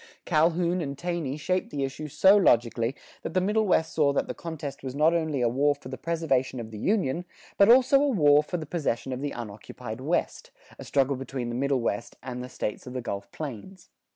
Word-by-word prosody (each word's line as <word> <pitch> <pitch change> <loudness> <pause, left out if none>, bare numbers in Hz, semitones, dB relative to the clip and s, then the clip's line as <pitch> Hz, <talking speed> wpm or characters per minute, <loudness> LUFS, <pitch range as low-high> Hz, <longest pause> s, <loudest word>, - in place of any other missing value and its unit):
Calhoun 170 +2 +2
and 140 -3 -4
Taney 170 -5 -3
shaped 185 +4 -1
the 140 -2 -3
issue 135 +3 -4
so 190 +7 +5
logically 120 - +3 0.3
that - - -6
the - - +5
Middle 210 +3 +1
West 160 -3 +2
saw 150 -3 +3
that - - 0
the - - -3
contest 155 -4 -6
was 130 -1 -6
not 155 +3 +4
only 160 -5 0
a 120 - +3
war 140 +5 +2
for 130 -2 -11
the 130 - -5
preservation 140 -7 0
of 110 -1 -7
the 105 - -7
Union, 175 - 0 0.3
but 200 +2 +5
also 260 +3 +6
a 290 - +3
war 150 - +5
for 165 +4 -4
the 160 - -5
possession 140 -5 -2
of 130 - -5
the 145 - -1
unoccupied 110 +1 -8
West, 175 - -1 0.3
a - - -7
struggle 135 -1 +1
between 130 -2 -4
the 120 - -4
Middle 135 0 +1
West 105 -3 -2
and 125 -1 -5
the 125 - -8
States 115 -1 -4
of 125 - -7
the 130 - -3
Gulf 100 -4 -5
Plains. 160 - -8
145 Hz, 215 wpm, -27 LUFS, 125-170 Hz, 0.3 s, also